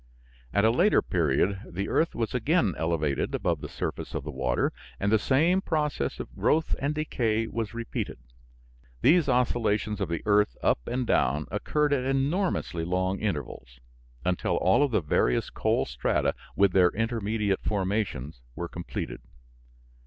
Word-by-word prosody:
At 100 +1 +3
a 110 - +5
later 180 - +4
period 90 +4 +1
the 100 +3 -3
earth 165 - +1
was 115 -2 -2
again 125 - +2
elevated 80 -4 -1
above - - -1
the - - -6
surface - - -5
of - - -2
the 75 - -5
water 65 -2 0 0.3
and 100 +1 0
the 110 - +5
same 165 - +3
process 150 - -1
of - - -7
growth 160 +1 +1
and 145 +2 -1
decay 115 -7 0
was 115 0 -4
repeated. 115 -1 -4 0.9
These 155 0 +5
oscillations 115 -4 +1
of - - -1
the 85 - -3
earth 105 - +3
up - - +3
and 125 0 -1
down 75 - +1
occurred 150 +8 +1
at 130 -3 +1
enormously 135 - 0
long 95 +2 -1
intervals, 70 - -4 0.5
until 90 -1 0
all 95 +9 +3
of 145 - +3
the 115 - +1
various 75 -5 +1
coal - - +1
strata - - 0 0.2
with 100 -1 +4
their 90 -1 +5
intermediate 110 -2 -1
formations 95 - -2
were 85 - -4
completed. 85 -5 -6
105 Hz, 155 wpm, -27 LUFS, 85-130 Hz, 0.9 s, a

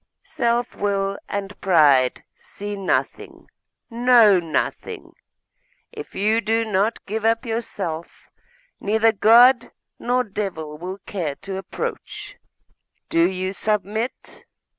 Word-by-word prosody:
Self 240 0 -1
will 200 -1 -1
and 200 0 -5
pride 145 -8 +4
see 205 0 -7
nothing, 195 -2 -2 0.4
know 235 -4 +5
nothing. 165 -2 -3 0.8
If - - -10
you 215 +3 +2
do 225 +2 0
not 210 +1 -1
give 215 +2 -4
up 230 +2 +1
yourself, 205 -8 -5 0.5
neither 220 +2 +2
God 240 +4 +5 0.3
nor 250 +1 +1
devil 185 -8 -5
will 185 +3 -6
care 165 -8 -3
to 195 -1 -5
approach. 190 - -6 0.7
Do 165 +1 +3
you 185 0 -3
submit? 215 +3 -3
205 Hz, 105 wpm, -22 LUFS, 185-225 Hz, 0.8 s, know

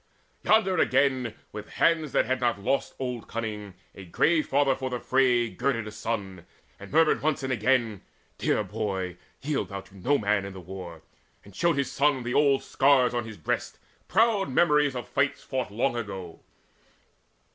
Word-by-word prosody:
Yonder 195 -5 +3
again, 130 -5 +2 0.2
with 105 0 -8
hands 160 -4 +2
that - - +2
had 130 0 -1
not 120 -4 +1
lost 135 +8 -1
Old 125 -3 -4
cunning, 105 -4 -5 0.2
a 100 - -10
grey 155 - +2
father 140 -1 +2
for 130 0 -4
the 125 -1 -3
fray 125 -2 +2
Girded 115 +2 -1
a 110 - -7
son, 105 -5 -5 0.3
and - - -11
murmured 160 +1 +3
once 150 -2 0
and 130 -1 -1
again: 120 -5 +1 0.4
"Dear - - +1
boy, 95 -3 -3 0.3
yield 145 0 -1
thou 100 -1 -5
to 95 +1 -20
no 130 +10 +1
man 105 -3 +1
in 100 0 -7
the 95 - -9
war!" 90 -2 -9 0.4
And 100 -1 -15
showed 170 +1 +1
his 140 -2 -1
son 140 -2 +1
the 120 +1 -3
old 140 -2 +3
scars 135 -3 +3
on 120 -1 -1
his 110 -2 -9
breast, 80 - -3 0.3
Proud 220 -2 +2
memories 150 -1 +3
of 125 - -5
fights 135 +1 0
fought 130 -3 -3
long 120 +5 0
ago. 95 -7 -6
125 Hz, 175 wpm, -27 LUFS, 105-140 Hz, 0.4 s, Yonder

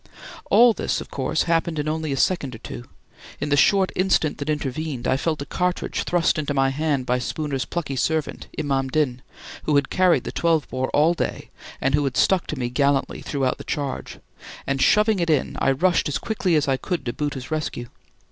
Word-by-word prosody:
All 240 0 +7
this, - - -1
of - - -9
course, 135 +3 0
happened 165 -1 0
in 150 0 -2
only 155 -1 -2
a 135 - -1
second 140 -6 0
or - - -8
two. 120 +2 -8 0.5
In 145 - -2
the 145 - +3
short 190 +6 +4
instant 185 -5 +1
that 145 +1 -4
intervened, 150 -2 -2
I - - +3
felt 150 +1 -1
a - - -11
cartridge 180 +3 -2
thrust 175 -3 +2
into 145 -1 -2
my 135 0 +3
hand 140 -1 -1
by 125 0 +1
Spooner's 140 +1 -3
plucky 150 -6 -4
servant, 155 +3 -1
Imam 135 -2 0
Din, 130 -3 0 0.4
who 150 - +2
had 140 -1 +2
carried 185 -2 +3
the - - -5
12 165 -3 +1
bore 130 0 -2
all 155 +4 +3
day - - -4 0.3
and 135 +1 0
who 145 0 +3
had 135 - -2
stuck 190 -2 +3
to 155 - -4
me 125 -2 -1
gallantly 140 +2 0
throughout 135 -3 -1
the - - -7
charge; 140 -3 -4 0.5
and 135 -1 -1
shoving 210 -1 +4
it 170 -1 0
in, 150 -4 +1
I - - +2
rushed 175 +6 +2
as 145 - -1
quickly 195 -6 0
as 150 -2 +2
I 135 -1 +2
could 165 -1 -3
to 120 - -2
Bhoota's 145 -2 -4
rescue. 155 -6 -3
145 Hz, 205 wpm, -23 LUFS, 135-165 Hz, 0.5 s, All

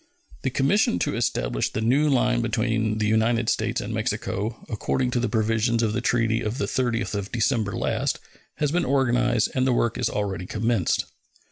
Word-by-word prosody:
The 130 - 0
commission 135 - +2
to - - -1
establish - - 0
the - - -4
new 135 +7 +3
line 125 -3 +2
between 115 -1 0
the 110 - 0
United 110 +2 +2
States - - 0
and - - -4
Mexico, 110 +4 -3
according 125 +3 -1
to 125 - +1
the 120 - 0
provisions 115 +1 +1
of 110 -2 +1
the - - -1
treaty 115 -1 +1
of 110 +3 -3
the 140 - 0
30th 120 -4 -1
of 100 -1 -3
December 110 -3 0
last, - - -1 0.4
has 150 -2 0
been 175 +2 +1
organized, 125 -4 +2
and 130 0 +1
the 130 - +3
work 120 0 0
is 125 - +1
already 95 -3 -3
commenced. 110 -3 0
115 Hz, 180 wpm, -24 LUFS, 110-125 Hz, 0.4 s, new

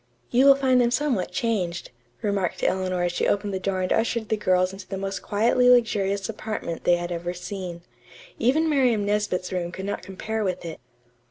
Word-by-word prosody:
"You 255 +3 +5
will 275 - +9
find 260 -2 +3
them 240 - +3
somewhat 250 -7 0
changed," 185 -4 -2 0.3
remarked 200 -4 -1
Eleanor 185 -1 0
as 175 - +1
she - - 0
opened 205 0 0
the 190 - -1
door 185 -1 -1
and 185 - +1
ushered 225 -1 0
the - - +2
girls 185 -2 +1
into 195 0 -10
the 195 - -4
most 195 0 -4
quietly 235 +4 +3
luxurious 200 -5 +2
apartment 215 -6 -5
they 175 - +5
had 175 0 -4
ever 175 +1 -3
seen. 180 -2 -6 0.6
Even 295 +7 +3
Miriam 250 -8 +2
Nesbit's 205 -3 -1
room 175 -1 -2
could 190 +1 -6
not 205 - -3
compare 215 +4 -4
with 185 -3 -2
it. 165 -1 -6
200 Hz, 190 wpm, -25 LUFS, 185-225 Hz, 0.6 s, will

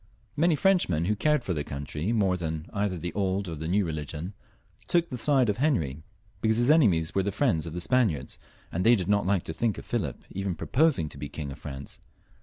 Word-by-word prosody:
Many 165 +2 +3
Frenchmen, 145 - +2
who 105 +3 +1
cared 150 +4 +2
for 90 - -1
their 75 -3 -2
country 75 +7 -4
more 100 -5 +2
than 80 -3 -3
for - - -17
either 100 -3 0
the 85 +1 -5
old 95 -1 -1
or 85 - -4
the 80 0 -5
new 100 +3 +2
religion, 80 +3 -5 0.5
took 170 -1 +2
the - - -4
side 135 -1 +3
of 105 - 0
Henry, 80 - 0 0.4
because 110 0 +2
his 120 +4 +4
enemies 95 - +4
were 95 - +2
the 100 +2 -1
friends 95 - +1
of 80 - -6
the 90 - -2
298 115 - +2
HENRY 65 - -7
IV, - - -11
[CH. - - -10
Spaniards, - - -15
and 90 - -1
they 120 +2 +6
did 90 -5 -2
not 100 -2 +2
like 95 -3 +2
to 80 - -5
think 110 +5 0
of - - -8
Philip - - -3
even 95 -2 -2
proposing 135 - +2
to 70 - -10
be 70 0 -5
King 70 -1 -6
of - - -9
France. 70 -1 -8
95 Hz, 245 wpm, -27 LUFS, 80-115 Hz, 0.5 s, they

